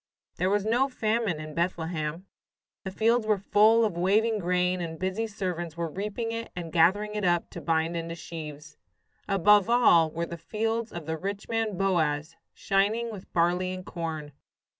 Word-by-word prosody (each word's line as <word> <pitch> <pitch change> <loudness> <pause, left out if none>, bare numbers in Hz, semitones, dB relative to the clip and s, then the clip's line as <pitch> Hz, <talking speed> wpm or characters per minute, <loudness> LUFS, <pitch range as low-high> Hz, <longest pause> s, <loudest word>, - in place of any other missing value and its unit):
There 185 +2 +1
was 205 0 +1
no 245 +5 +2
famine 220 - 0
in 155 0 -7
Bethlehem. 165 -1 -2 0.6
The 190 - -4
fields 225 +3 +1
were 215 -1 +3
full 215 +3 +4
of 205 -6 -2
waving 210 +5 +2
grain, 180 0 +1
and 165 -1 -5
busy 190 +6 -2
servants 180 -6 -4
were 170 -2 -2
reaping 210 +5 -3
it 230 0 -5
and 170 -2 -6
gathering 200 +6 +3
it 210 -1 -3
up 175 -2 +1
to - - -7
bind 165 +1 0
into 165 0 -4
sheaves. 155 -2 -9 0.5
Above 205 +1 +4
all 175 -10 +5
were 165 +2 -3
the 170 0 -7
fields 225 +6 -2
of 170 -3 -7
the 160 0 -3
rich 200 +3 -4
man, 225 -4 -1
Boaz, 165 -5 0 0.2
shining 215 +4 +1
with 200 -3 -10
barley 180 +2 +1
and 185 0 -9
corn. 160 -3 -5
185 Hz, 170 wpm, -27 LUFS, 165-215 Hz, 0.6 s, all